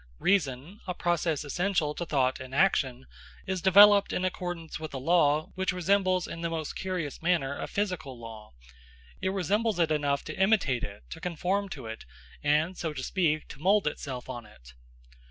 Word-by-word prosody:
Reason, 170 -1 0
a 180 - -2
process 170 -4 0
essential 170 0 0
to 175 +2 -5
thought 130 -3 +1
in 130 0 -8
action, 135 -7 +2 0.4
is 190 -1 -2
developed 200 +2 +7
in 185 - -1
accordance 175 -3 -4
with 155 -3 -6
a - - -2
law 150 +1 +2
which 190 0 0
resembles 185 0 +1
in 165 - -7
the 170 - -1
most 160 -2 -4
curious 180 -7 -4
manner 165 -5 +1
a - - -5
physical 180 - -3
law. 110 -2 -10 0.7
It - - 0
resembles 200 +3 0
it 165 -2 +2
enough 145 -2 +1
to 155 - -6
imitate 190 - +2
it, 100 0 -7
to 165 - -7
conform 180 +4 -1
to 130 - -9
it, 110 0 -7 0.4
and, 150 +5 +2
so 160 -3 -3
to 130 -3 -5
speak, 155 -3 0
to 140 - -10
mould 200 +4 +3
itself 135 -4 -4
on 120 -4 -7
it. - - -17
165 Hz, 175 wpm, -28 LUFS, 140-185 Hz, 0.7 s, developed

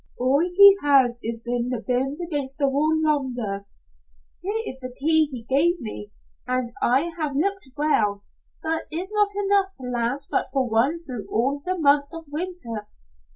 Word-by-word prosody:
"All 260 +3 +2
he 390 +4 +7
has 265 -4 +3
is 230 0 -5
in 240 0 -1
the 250 -2 -2
bins 265 +5 -1
against 290 -6 -3
the 285 -2 +2
wall 305 +4 +1
yonder." 245 -10 -1 0.7
"Here 430 +4 -1
is 265 - +2
the 255 -1 -7
key 315 +2 +4
he 255 -6 -7
gave 310 +9 +2
me, 215 -4 -7 0.4
and 250 -1 -1
I 275 +8 +2
have 300 -3 -2
look 390 +6 0 0.2
well, 210 -9 +1 0.4
but 320 0 -1
is 360 +5 -2
not 415 -1 +2
enough 400 -1 +1
to 260 - -10
last 250 +3 -1
but - - 0
for 265 -2 0
one 240 +8 +1
through 255 -10 -8
all 270 +6 0
the 370 0 -2
months 285 -1 +2
of 330 0 -8
winter. 290 - -4
280 Hz, 170 wpm, -24 LUFS, 245-330 Hz, 0.7 s, he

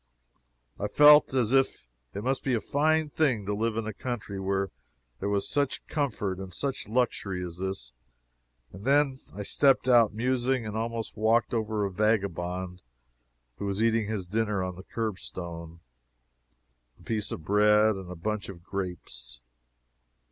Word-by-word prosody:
I - - -1
felt 150 0 +7
as 125 -2 +2
if 135 - +2 0.3
it 100 - -4
must 130 +2 0
be 130 -2 +1
a - - +1
fine 155 +5 +1
thing 130 -11 +1
to 105 - -1
live 110 +1 -1
in 115 - -1
a 110 - -4
country 110 -3 -5
where 95 0 -1 0.5
there 100 - -2
was 100 -1 0
such 140 -2 0
comfort 110 - -2
and 95 -1 -7
such 135 +8 -2
luxury 105 -6 -1
as 85 0 -8
this. 95 -11 -4 0.8
And 95 +2 -10
then 140 0 +3 0.2
I 100 - -4
stepped 135 +4 +3
out 120 -4 +6
musing, 125 +2 0
and 105 0 -5
almost 115 0 -3
walked 110 +3 +2
over 110 -2 0
a 100 - -3
vagabond 90 -3 -1 0.8
who - - -4
was 100 0 -2
eating 115 -1 +2
his 105 -4 -3
dinner 105 0 0
on 90 -1 -4
the 95 - -9
curbstone 85 -6 -5 1.2
a - - -18
piece 110 -2 -1
of 80 - -5
bread 105 +2 +4
and 95 -2 -8
a 90 - -6
bunch 105 +4 -3
of 85 -3 -10
grapes. 90 -11 -5
105 Hz, 160 wpm, -28 LUFS, 95-120 Hz, 1.2 s, felt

